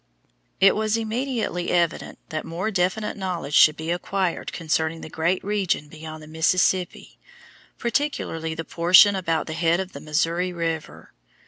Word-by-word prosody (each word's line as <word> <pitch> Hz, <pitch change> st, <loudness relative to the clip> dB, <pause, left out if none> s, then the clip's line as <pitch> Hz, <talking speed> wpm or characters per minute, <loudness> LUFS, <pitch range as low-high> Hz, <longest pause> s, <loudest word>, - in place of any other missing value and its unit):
It 195 Hz, 0 st, +6 dB
was 215 Hz, +1 st, 0 dB
immediately 225 Hz, -5 st, -2 dB
evident 170 Hz, -2 st, 0 dB
that 155 Hz, -1 st, -3 dB
more 180 Hz, +6 st, -3 dB
definite 190 Hz, +3 st, -1 dB
knowledge 180 Hz, -7 st, -4 dB
should 155 Hz, +1 st, +6 dB
be 160 Hz, +1 st, -3 dB
acquired 180 Hz, +1 st, -2 dB
concerning 160 Hz, 0 st, -1 dB
the 160 Hz, -, -9 dB
great 170 Hz, +3 st, 0 dB
region 195 Hz, -7 st, -1 dB
beyond 155 Hz, 0 st, -9 dB
the -, -, -12 dB
Mississippi, 180 Hz, +3 st, 0 dB, 0.6 s
particularly 235 Hz, -, -2 dB
the 165 Hz, 0 st, -5 dB
portion 185 Hz, +6 st, +6 dB
about 165 Hz, -4 st, -1 dB
the 160 Hz, -, -5 dB
head 165 Hz, +1 st, +1 dB
of 190 Hz, 0 st, -4 dB
the 140 Hz, -, -8 dB
Missouri 165 Hz, +4 st, 0 dB
River. 165 Hz, -3 st, -5 dB
170 Hz, 145 wpm, -24 LUFS, 160-190 Hz, 0.6 s, It